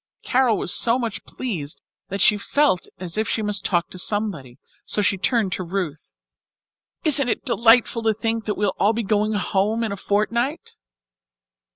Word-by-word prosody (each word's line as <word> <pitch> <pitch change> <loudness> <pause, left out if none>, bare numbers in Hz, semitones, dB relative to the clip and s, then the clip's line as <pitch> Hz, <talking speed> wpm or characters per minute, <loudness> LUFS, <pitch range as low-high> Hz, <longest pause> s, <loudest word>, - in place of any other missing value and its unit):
Carol 250 -4 +2
was - - -1
so 235 +1 +3
much 230 -4 -4
pleased 170 - -5 0.3
that 195 0 -3
she 210 - +6
felt 205 -1 +1
as 180 +2 -4
if 220 - -1
she 220 - -1
must 205 -2 -1
talk 175 -3 0
to 185 - -7
somebody, 180 - -2 0.3
so 210 - 0
she 195 - +2
turned 195 +1 0
to 185 - -3
Ruth. 170 - -4 0.9
"Isn't 285 -4 +4
it - - -2
delightful 230 +1 +4
to 220 -1 +2
think 225 +1 -2
that 210 - -2
we'll 205 -1 0
all 210 +3 +3
be 230 +1 -2
going 210 +1 0
home 205 +3 0
in 220 - -2
a - - -3
fortnight?" 235 - -1
210 Hz, 175 wpm, -22 LUFS, 190-230 Hz, 0.9 s, she